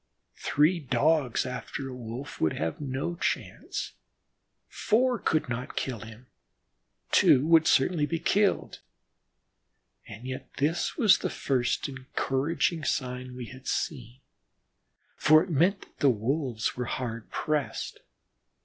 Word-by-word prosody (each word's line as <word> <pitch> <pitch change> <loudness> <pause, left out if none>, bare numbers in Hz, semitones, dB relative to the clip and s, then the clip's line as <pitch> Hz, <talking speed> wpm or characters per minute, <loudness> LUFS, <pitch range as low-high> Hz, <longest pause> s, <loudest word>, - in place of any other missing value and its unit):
Three 155 +5 +3
Dogs 140 -1 +1
after 130 +1 -5
a 130 - -7
Wolf 125 +3 -7
would 80 - +2
have 80 - -3
no 140 +5 -3
chance, - - -3 0.7
four 245 +2 +1
could 155 -4 +1
not 125 +1 -4
kill 125 -4 -2
him, 110 +3 -11 0.9
two 135 +2 +5
would 160 -1 +5
certainly 150 +2 +3
be 165 - -1
killed. 200 +4 +1 1.3
And 105 +4 -10
yet 130 0 -6
this 155 +5 0
was 220 -9 +6
the - - -2
first 125 -3 0
encouraging 140 +4 -1
sign 125 -2 -2
we 125 -1 -6
had 130 +1 -12
seen, 125 -3 -3 1.0
for 155 +1 +6
it 185 - -7
meant 175 +7 +3
that - - -17
the 140 - +5
Wolves 125 0 -1
were 125 - -3
hard 115 -2 -4
pressed. 150 -2 -2
135 Hz, 125 wpm, -28 LUFS, 125-160 Hz, 1.3 s, was